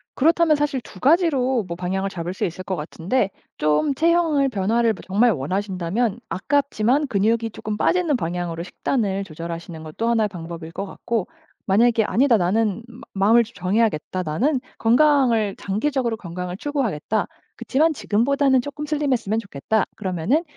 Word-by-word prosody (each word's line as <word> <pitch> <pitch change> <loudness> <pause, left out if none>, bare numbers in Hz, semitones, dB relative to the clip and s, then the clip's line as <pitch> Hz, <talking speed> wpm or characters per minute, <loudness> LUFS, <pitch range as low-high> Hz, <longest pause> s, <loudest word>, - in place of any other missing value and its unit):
그렇다면 325 +2 +4
사실 290 -3 -1
2 200 - -13
가지로 270 - +3
뭐 170 - -4
방향을 190 +2 -2
잡을 175 -1 -5
수 190 - -4
있을 180 +1 -5
거 190 - -2
같은데 180 +8 -1 0.3
좀 155 - +1
체형을 325 -3 +3
변화를 225 +2 +1
뭐 195 - -11
정말 215 +6 +3
원하신다면 190 - -1
아깝지만 275 +3 +1
근육이 225 +1 +1
쪼끔 210 0 -5
빠지는 335 +1 +2
방향으로 170 -2 -3
식단을 200 +1 -1
조절하시는 165 -1 -7
것도 160 +9 -3
1 230 -2 +3
의 - - +2
방법일 165 -3 -8
것 195 - -4
같고 220 +1 -3 0.4
만약에 225 +3 +4
"아니다. 240 +4 +3
나는 205 +3 +1
마 240 +1 -13 0.3
마음을 235 +2 +6
좀 230 +1 -14
정해야겠다. 185 -2 0
나는 250 - 0 0.2
건강을 240 -4 +3
장기적으로 235 +3 -1
건강을 180 -1 -6
추구하겠다. 220 - -1 0.3
그렇지만 310 +5 +1
지금보다는 265 +3 +2
쪼끔 290 +3 -6
슬림 295 -2 0
했으면 225 -3 -1
좋겠다." 200 +1 -1
그러면은 190 - 0
220 Hz, 375 characters per minute, -22 LUFS, 185-265 Hz, 0.4 s, 마음을